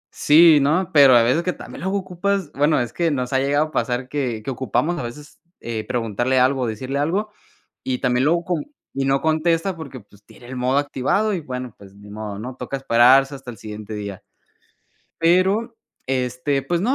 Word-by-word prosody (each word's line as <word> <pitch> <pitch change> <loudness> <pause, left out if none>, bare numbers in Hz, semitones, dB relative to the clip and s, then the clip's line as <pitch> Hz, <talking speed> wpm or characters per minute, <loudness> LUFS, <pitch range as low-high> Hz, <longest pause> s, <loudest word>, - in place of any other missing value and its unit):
¿sí, 155 0 +6
no? 165 +6 +1
Pero 140 -4 +7
a 115 - +6
veces 130 +8 +2
que 180 +1 -2
también - - -10
luego 190 +2 -1
ocupas 190 -2 -2
bueno, 145 +1 +2
es 120 -1 -3
que 170 -1 0
nos 130 -3 -2
ha 130 - +3
llegado 145 +3 +1
a 155 - -11
pasar 125 -2 -2
que 125 -7 -3
que 135 - -4
ocupamos 130 - -1
a - - -4
veces, 145 +6 -10 0.2
eh 110 -2 -4
preguntarle 120 +2 0
algo 130 +1 +2
o 120 - 0
decirle 130 +6 -4
algo 195 +8 -1 0.5
y 130 -1 -1
también 125 +1 +1
luego 170 +3 +2
con 175 -4 -2 0.3
y 135 0 -1
no 135 0 +2
contesta 165 +3 0
porque, 140 -5 -8
pues, 105 0 -22
tiene 120 - -16
el 130 - -8
modo 125 +2 +1
activado 145 +9 0
y 180 - -2
bueno, 125 -5 -6
pues 100 -1 -16
ni 105 0 -14
modo, 105 -1 -6
¿no? 125 +4 -6
Toca 125 +2 -5
esperarse 135 +2 +4
hasta 135 -2 -9
el 115 - -12
siguiente 105 0 -8
día. 100 -2 -6 1.0
Pero, 190 +7 +2 0.3
este, 130 +2 -1
pues 170 +5 -1
no,, 250 +7 +1
135 Hz, 200 wpm, -21 LUFS, 125-165 Hz, 1.0 s, Pero